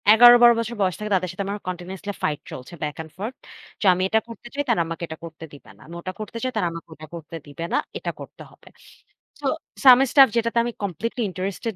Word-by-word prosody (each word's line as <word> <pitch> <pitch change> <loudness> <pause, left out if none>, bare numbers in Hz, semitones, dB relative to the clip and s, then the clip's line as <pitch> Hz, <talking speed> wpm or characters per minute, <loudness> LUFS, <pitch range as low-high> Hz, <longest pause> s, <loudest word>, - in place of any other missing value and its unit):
১১-১২ 240 +2 +9
বছর 230 +1 -3
বয়স 185 -3 +1
থেকে 210 0 -5
তাদের 185 -1 0
সাথে 190 +2 -4
আমার 205 +1 -3
continuously 185 +3 -5
fight 150 -1 0
চলছে 130 +5 -9
বাক 150 -1 -3
অ্যান্ড 160 -1 -8
ফর্থ। 220 +7 -5 0.4
তো - - -3
আমি 180 - -2
এটা 220 - +3
করতে 230 +1 -11
চাই 285 +1 -1
তারা 225 -7 +3
আমাকে 165 +1 -6
এটা 160 - -7
করতে 165 -1 -9
দিবে 145 - -14
না। - - -21
আমি 170 - -10
ওটা 185 +1 -5
করতে 215 +2 -6
চাই 255 - 0
তারা 175 - +1
আমাকে 165 0 -9
ওটা 155 +1 -11
করতে 165 0 -9
দিবে 145 +3 -8
না। - - +4 0.2
এটা - - -3
করতে - - -11
হবে। - - -22 0.7
so - - -6 0.4
some 255 -2 +9
stuff 275 -2 +8
যেটাতে 230 0 0
আমি 240 - -2
completely 210 - -3
interested 195 +4 -4
195 Hz, 225 wpm, -23 LUFS, 165-230 Hz, 0.7 s, ১১-১২